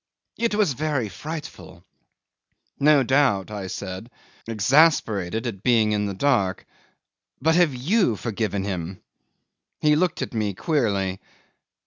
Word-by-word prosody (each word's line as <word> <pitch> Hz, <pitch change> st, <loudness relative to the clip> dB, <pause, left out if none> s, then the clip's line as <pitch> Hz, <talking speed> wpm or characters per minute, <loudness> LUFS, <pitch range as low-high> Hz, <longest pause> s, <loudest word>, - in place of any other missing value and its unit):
It 230 Hz, -2 st, +1 dB
was 205 Hz, -9 st, +2 dB
very 140 Hz, -4 st, -2 dB
frightful." 145 Hz, -, -8 dB, 1.0 s
"No 145 Hz, -1 st, +5 dB
doubt," 130 Hz, -7 st, +2 dB
I 100 Hz, -3 st, -5 dB
said, 95 Hz, +4 st, -6 dB, 0.4 s
exasperated 110 Hz, -, +2 dB
at 105 Hz, -6 st, -5 dB
being 110 Hz, -3 st, +3 dB
in 105 Hz, -1 st, 0 dB
the 100 Hz, -, -4 dB
dark; 100 Hz, -7 st, +1 dB, 0.7 s
"but 160 Hz, +4 st, +2 dB
have 170 Hz, -5 st, +3 dB
you 155 Hz, -, +1 dB
forgiven 105 Hz, -2 st, -3 dB
him?" 95 Hz, -2 st, -4 dB, 0.8 s
He 150 Hz, 0 st, +3 dB
looked 175 Hz, +2 st, 0 dB
at -, -, -7 dB
me 105 Hz, -4 st, -1 dB
queerly. 100 Hz, -, -1 dB
115 Hz, 120 wpm, -23 LUFS, 100-150 Hz, 1.0 s, No